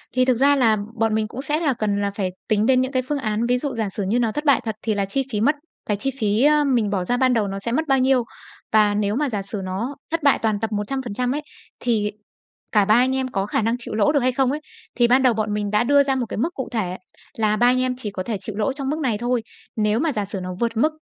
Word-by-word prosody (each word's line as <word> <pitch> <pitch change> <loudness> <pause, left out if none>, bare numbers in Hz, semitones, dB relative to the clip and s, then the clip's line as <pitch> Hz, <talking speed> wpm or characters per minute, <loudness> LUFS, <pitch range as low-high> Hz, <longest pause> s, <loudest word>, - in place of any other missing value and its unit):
Thì 255 0 +4
thực 255 -2 +2
ra 280 +3 +4
là 230 -5 +3 0.2
bọn 225 -1 +2
mình 220 0 0
cũng 245 +4 -7
sẽ 295 +2 -1
là 300 -5 +1
cần 210 -3 -1
là 200 0 0
phải 195 -3 -1 0.2
tính 215 -1 +2
đến 255 +1 +4
những 260 +1 -2
cái 260 -2 +1
phương 295 - 0
án, 220 -2 -1
ví 245 +1 +2
dụ 280 +2 -3
giả 220 -3 -1
sử 200 +1 -4
như 230 +5 +1
nó 230 -2 +1
thất 295 +6 -4
bại 280 -4 +4
thật 220 -2 -2
thì 220 - 0
là 200 -1 0
chi 270 +8 -1
phí 210 -2 -1
mất 285 +7 +3 0.3
cái 210 - -1
chi 270 +6 -2
phí, 215 +1 +2
á, 300 0 +5
mình 245 -7 +1
bỏ 190 -3 -1
ra 245 +6 0
ban 255 0 +3
đầu 220 -4 +1
nó 195 0 -4
sẽ 230 +4 -4
mất 315 +6 0
bao 270 -1 +3
nhiêu. 260 -1 +3 0.5
Và 210 -1 +4
nếu 205 0 0
mà 290 +2 0
giả 210 -4 -2
sử 200 +1 -6
nó 200 +9 -3 0.2
thất 330 -2 -1
bại 280 - +4
toàn 215 -2 +1
tập 225 0 -3
100% 245 +2 -2
ấy, 300 - -2 0.4
thì 215 -4 0 0.6
cả 210 -2 +4
ba 215 - +4
anh 255 +2 +3
em 265 -1 0
có 195 -3 -1
khả 210 - 0
năng 230 +2 +1
chịu 230 - -6
lỗ 215 +6 +3
được 290 - +3
hay 255 0 +2
không 260 0 +1
ấy. 300 - -2 0.4
Thì 240 -1 +4
ban 255 +2 +4
đầu 255 -2 +5
bọn 215 -1 -1
mình 205 -1 -2
đã 210 +2 +3
đưa 285 +3 +5
ra 270 -1 0
một 255 -2 -1
cái - - -4
mức 320 +11 -1
cụ 265 - -5
thể 190 -6 -2 0.4
là 215 -1 +2
ba 240 +3 +3
anh 255 +1 +3
em 255 0 0
chỉ 220 -5 -5
có 185 -2 -4
thể 220 +1 -3
chịu 215 -4 -6
lỗ 220 +5 0
trong 275 -1 -4
mức 305 +2 -1
này 250 -8 0
thôi, 240 +1 0 0.3
nếu 215 0 +1
mà 320 +2 +1
giả 210 -6 -2
sử 195 0 -5
nó 180 - -5
vượt 230 -1 -1
mức 305 +8 +3
235 Hz, 300 wpm, -22 LUFS, 210-265 Hz, 0.6 s, á